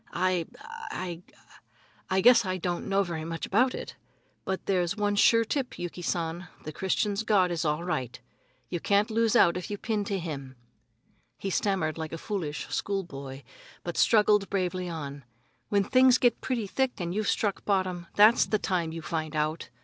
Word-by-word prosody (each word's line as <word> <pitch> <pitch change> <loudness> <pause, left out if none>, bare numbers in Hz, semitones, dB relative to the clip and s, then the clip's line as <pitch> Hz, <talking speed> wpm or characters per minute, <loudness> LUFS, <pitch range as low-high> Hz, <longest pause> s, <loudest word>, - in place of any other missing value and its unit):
"I 180 -2 +1 0.4
I 175 -2 -5 0.9
I 190 0 +2
guess 240 +2 +7
I 185 -1 -2
don't 175 -1 -3
know 200 0 +3
very 170 -4 -4
much 165 0 -4
about 250 +6 +2
it. - - -7 0.5
But 190 0 -3
there's 185 0 0
one 205 -1 +1
sure 230 +2 +5
tip, 265 +2 -2
Yuki 175 0 -5
San, 170 0 -2 0.2
the 155 - -5
Christians' 200 +4 0
God 200 -5 +3
is 170 -2 -1
all 150 +2 0
right. 130 -8 -3 0.5
You 175 - -3
can't 205 +5 +2
lose 225 0 +2
out 175 -1 +5
if 180 - -6
you 205 - -3
pin 215 -1 -1
to 200 -1 -1
him." 140 -7 -6 0.8
He 195 - -4
stammered 180 -6 0
like 160 0 -5
a - - -3
foolish 165 -5 -4
schoolboy, 140 -9 -4 0.4
but 175 - -4
struggled 210 -2 +4
bravely 185 -2 -1
on: 145 -4 -6 0.5
"When 200 -1 +3
things 255 +3 +5
get 245 -2 +2
pretty 245 -4 -1
thick 260 +6 0
and 175 -1 -3
you've 210 +1 -1
struck 205 -3 0
bottom, 185 -3 -1
that's 215 +3 +6
the 215 - +2
time 175 -5 -1
you 165 0 -7
find 155 -1 -3
out. 155 +2 -1
185 Hz, 175 wpm, -28 LUFS, 165-205 Hz, 0.9 s, guess